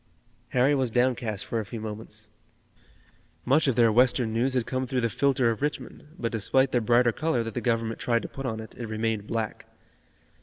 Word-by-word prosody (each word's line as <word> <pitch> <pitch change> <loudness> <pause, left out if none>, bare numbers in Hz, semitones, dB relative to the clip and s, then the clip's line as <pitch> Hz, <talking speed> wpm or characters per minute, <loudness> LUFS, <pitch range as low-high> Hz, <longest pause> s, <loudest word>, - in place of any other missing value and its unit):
Harry 130 +3 +3
was 130 -3 +1
downcast 120 -3 0
for 115 - -2
a - - -2
few 115 +3 -7
moments. 110 0 -7 1.2
Much 140 +4 +3
of 130 - +2
their 115 -1 +5
Western 120 0 +3
news 125 +3 +1
had 125 -3 +1
come 130 0 -2
through 130 -1 -1
the 115 -1 0
filter 130 0 +2
of 115 - -5
Richmond, 150 0 -4
but 115 -6 -2
despite 130 +4 +2
the 120 - +2
brighter 120 +1 +4
color 135 -2 0
that 115 -1 -6
the - - -3
Government 115 -2 -1
tried 115 -1 +1
to - - -4
put 135 -1 -6
on 110 -2 -3
it, 110 - -9
it 120 - -6
remained 110 -1 -2
black. 110 -2 -3
120 Hz, 200 wpm, -27 LUFS, 110-130 Hz, 1.2 s, their